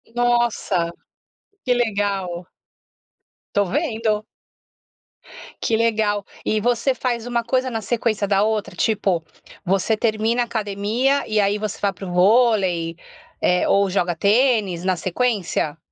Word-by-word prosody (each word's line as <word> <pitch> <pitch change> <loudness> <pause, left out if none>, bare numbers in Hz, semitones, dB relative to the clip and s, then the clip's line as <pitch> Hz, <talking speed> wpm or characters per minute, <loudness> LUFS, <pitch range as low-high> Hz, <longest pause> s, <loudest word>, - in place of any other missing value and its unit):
Nossa, 240 -8 +1 0.7
que 250 - +2
legal! 200 -6 -1 1.1
Tô 205 -1 +3
vendo. 220 - -1 1.4
Que 225 - +1
legal. 220 -3 +1 0.2
E 215 - +1
você 245 +3 +1
faz 240 -3 -2
uma 240 -1 -1
coisa 255 +1 0
na 225 -1 -3
sequência 215 -1 -1
da 200 0 +3
outra? 215 -1 -1
Tipo, 195 -6 0 0.4
você 195 +4 +1
termina 225 +2 +1
a - - -4
academia 220 +5 0
e 215 -1 +1
aí 200 +1 +2
você 210 -1 -4
vai 200 - +1
para 195 +1 -9
o 180 - -6
vôlei, 185 -4 +3 0.5
eh, 180 0 +2
ou 200 -1 +3
joga 180 -2 0
tênis, 205 -3 +2
na 185 -1 +1
sequência? 185 -5 -1
215 Hz, 130 wpm, -21 LUFS, 195-235 Hz, 1.4 s, Tô